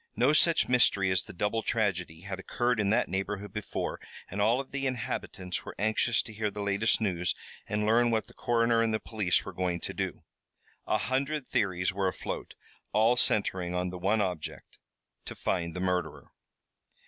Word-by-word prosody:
No 125 Hz, +7 st, +4 dB
such 165 Hz, +1 st, +4 dB
mystery 100 Hz, -6 st, +4 dB
as 95 Hz, -, +3 dB
the -, -, -9 dB
double 105 Hz, +5 st, 0 dB
tragedy 90 Hz, -8 st, -1 dB
had 95 Hz, 0 st, -5 dB
occurred 120 Hz, +4 st, 0 dB
in 100 Hz, -1 st, +2 dB
that 110 Hz, -, +3 dB
neighborhood 95 Hz, +1 st, -3 dB
before, 105 Hz, -, -3 dB, 0.3 s
and 100 Hz, +2 st, -2 dB
all 115 Hz, +5 st, +4 dB
of 135 Hz, -, -6 dB
the 135 Hz, -1 st, -1 dB
inhabitants 105 Hz, -7 st, -3 dB
were -, -, -8 dB
anxious 110 Hz, +3 st, +2 dB
to 110 Hz, -, -10 dB
hear 105 Hz, 0 st, -1 dB
the 105 Hz, 0 st, -5 dB
latest 100 Hz, +3 st, +2 dB
news 90 Hz, -4 st, 0 dB, 0.3 s
and 105 Hz, 0 st, 0 dB
learn 120 Hz, +2 st, +4 dB
what 110 Hz, -1 st, +1 dB
the -, -, -17 dB
coroner 115 Hz, -1 st, +2 dB
and 115 Hz, -1 st, +2 dB
the -, -, 0 dB
police 105 Hz, -6 st, 0 dB
were -, -, -6 dB
going 90 Hz, -2 st, -1 dB
to -, -, -4 dB
do. -, -, -3 dB, 0.6 s
A -, -, +3 dB
hundred 135 Hz, +6 st, -1 dB
theories 95 Hz, -5 st, 0 dB
were 95 Hz, 0 st, 0 dB
afloat, 95 Hz, -, -4 dB, 0.4 s
all 110 Hz, +3 st, +5 dB
centering 95 Hz, -7 st, +1 dB
on 90 Hz, 0 st, -1 dB
the 90 Hz, -, -6 dB
one 105 Hz, +4 st, +2 dB
object 90 Hz, -5 st, -4 dB, 0.5 s
to -, -, -7 dB
find 85 Hz, -2 st, -1 dB
the -, -, -3 dB
murderer. 90 Hz, -3 st, -2 dB
105 Hz, 185 wpm, -29 LUFS, 95-115 Hz, 0.6 s, all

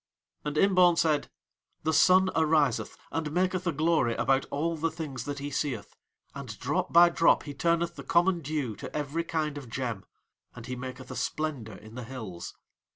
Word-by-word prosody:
And 150 Hz, 0 st, -3 dB
Imbaun 180 Hz, -2 st, +5 dB
said: 155 Hz, -3 st, +2 dB, 0.5 s
"The 160 Hz, -, +1 dB
Sun 185 Hz, +4 st, +5 dB
ariseth 150 Hz, -8 st, +2 dB
and 160 Hz, -2 st, -2 dB
maketh 185 Hz, +2 st, 0 dB
a -, -, +3 dB
glory 155 Hz, -6 st, +2 dB
about 135 Hz, 0 st, +1 dB
all 165 Hz, +4 st, -1 dB
the 165 Hz, +1 st, 0 dB
things 150 Hz, -6 st, -6 dB
that 145 Hz, -1 st, -4 dB
he 145 Hz, +1 st, -5 dB
seeth, 130 Hz, -6 st, -3 dB, 0.4 s
and -, -, -7 dB
drop -, -, -1 dB
by 170 Hz, +1 st, +8 dB
drop 165 Hz, -1 st, +3 dB
he 145 Hz, -, -7 dB
turneth 170 Hz, +3 st, 0 dB
the -, -, -7 dB
common 175 Hz, +1 st, +3 dB
dew 140 Hz, -7 st, -3 dB
to -, -, -8 dB
every 150 Hz, +3 st, -2 dB
kind 155 Hz, -3 st, -2 dB
of 130 Hz, -4 st, -12 dB
gem. 115 Hz, -4 st, -3 dB, 0.5 s
And 120 Hz, -, -9 dB
he 125 Hz, +2 st, -4 dB
maketh 130 Hz, 0 st, -7 dB
a -, -, -6 dB
splendour 140 Hz, -9 st, -3 dB
in 110 Hz, +1 st, -13 dB
the 125 Hz, 0 st, -7 dB
hills. 110 Hz, -9 st, -7 dB
150 Hz, 180 wpm, -28 LUFS, 130-165 Hz, 0.5 s, by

